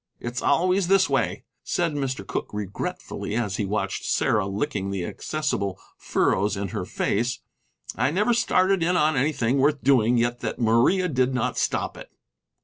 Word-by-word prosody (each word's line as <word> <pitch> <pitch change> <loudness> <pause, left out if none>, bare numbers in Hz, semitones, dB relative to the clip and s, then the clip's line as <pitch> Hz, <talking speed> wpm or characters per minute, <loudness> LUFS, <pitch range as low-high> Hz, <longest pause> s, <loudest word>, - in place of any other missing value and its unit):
"It's 120 0 -4
always 180 +5 +2
this 195 0 +4
way," - - -1 0.2
said 170 -3 0
Mr. 130 -8 -3
Cooke, - - -4
regretfully, 105 +1 -4
as 105 -5 -1
he 105 - -1
watched 105 +2 -2
Sarah 105 -3 +1
licking 100 -1 -2
the 95 -3 -3
accessible 100 - -3 0.2
furrows 100 +2 0
in 100 -1 -3
her - - -4
face; 120 +4 -1 0.5
"I 125 +4 +1
never 210 +9 +2
started 195 -5 +2
in 175 +2 +2
on 155 -2 +3
anything 135 -2 +1
worth 145 +1 +2
doing 125 -3 +4
yet 120 +1 0
that - - -4
Maria 120 +11 +3
did 130 -4 +1
not 125 - -1
stop - - -1
it." - - -11
125 Hz, 160 wpm, -25 LUFS, 105-155 Hz, 0.5 s, this